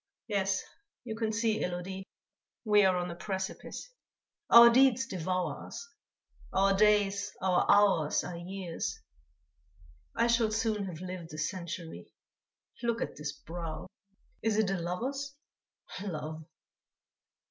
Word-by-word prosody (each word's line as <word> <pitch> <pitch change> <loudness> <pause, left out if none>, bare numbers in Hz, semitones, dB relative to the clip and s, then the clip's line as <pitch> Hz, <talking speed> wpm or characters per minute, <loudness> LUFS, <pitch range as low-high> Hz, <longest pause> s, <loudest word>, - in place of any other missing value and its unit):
"Yes, 195 -3 0 0.4
you 225 -3 -5
can 220 -1 -1
see, 220 0 +1
Élodie, 180 +2 -3 0.6
we 210 -1 +5
are 185 -1 +4
on 175 0 -2
a - - -6
precipice; 190 - -5 0.6
our 235 0 +11
deeds 260 0 +5
devour 185 - -2
us. 280 - -8 0.6
Our 195 +1 +3
days, 205 0 +3
our 185 -1 +2
hours 200 -7 +4
are 180 - -5
years. 175 0 -4 1.2
I - - +3
shall 235 -1 +3
soon 215 -2 0
have 175 -3 -7
lived 180 -3 -6
a - - -7
century. 170 0 -5 0.7
Look 235 -1 0
at - - -3
this 150 -1 -4
brow! 165 +2 -7 0.6
Is 220 -1 +1
it 215 -3 +2
a 195 - -1
lover's? 265 +11 -3 0.7
Love!..." 155 -4 -5
195 Hz, 125 wpm, -31 LUFS, 175-220 Hz, 1.2 s, our